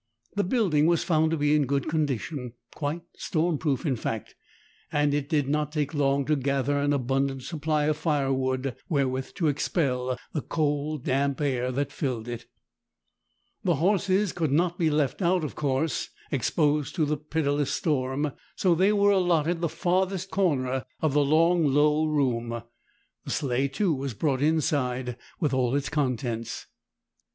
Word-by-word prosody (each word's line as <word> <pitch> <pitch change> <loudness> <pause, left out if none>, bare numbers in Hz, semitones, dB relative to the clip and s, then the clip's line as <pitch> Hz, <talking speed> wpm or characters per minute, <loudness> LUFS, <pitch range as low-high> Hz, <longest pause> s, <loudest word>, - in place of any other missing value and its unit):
The 205 - +2
building 180 - +2
was 170 -1 +3
found 160 -2 +2
to 165 - 0
be 145 0 +3
in 145 -3 +2
good 140 0 0
condition—quite 145 - -3
storm 160 -2 0
proof, 145 -4 -1
in 135 -4 +1
fact—and 145 +6 -4
it 145 0 -1
did 150 -4 +1
not 150 +1 0
take 150 -2 -1
long 140 -1 +1
to 150 - +2
gather 140 0 0
an 145 0 +1
abundant 135 0 0
supply 155 +1 -1
of 155 0 +1
firewood 135 -4 0
wherewith 135 -4 -1
to 170 -5 +1
expel 130 -4 0 0.2
the 150 - -1
cold, 150 -1 -1
damp 140 +1 0
air 130 -4 0
that 140 +2 -1
filled 125 -7 -3
it. 120 -1 -6 1.2
The 175 - +2
horses 195 +3 +2
could 160 -5 -1
not 170 +4 +1
be 165 -2 +3
left 150 +2 0
out, 180 -1 +2
of 150 - -3
course, 145 +2 -1 0.2
exposed 145 +2 +1
to 160 -4 +2
the 150 +1 0
pitiless 145 -1 -1
storm, 145 -1 0 0.2
so 180 -3 +3
they 190 +5 +3
were 205 -1 +4
allotted 175 -3 +2
the 170 - +1
farthest 185 +2 0
corner 135 -9 +1 0.2
of 155 -3 +1
the 145 0 +4
long, 165 +4 +4
low 150 +2 +3
room. 120 -6 0 0.6
The - - -7
sleigh, 135 -1 0
too, 170 +5 0
was 135 -4 -4
brought 135 +1 0
inside 130 -5 0 0.2
with 150 -6 0
all 130 0 +1
its 140 -1 -1
contents. 125 -6 -2
145 Hz, 155 wpm, -27 LUFS, 135-160 Hz, 1.2 s, were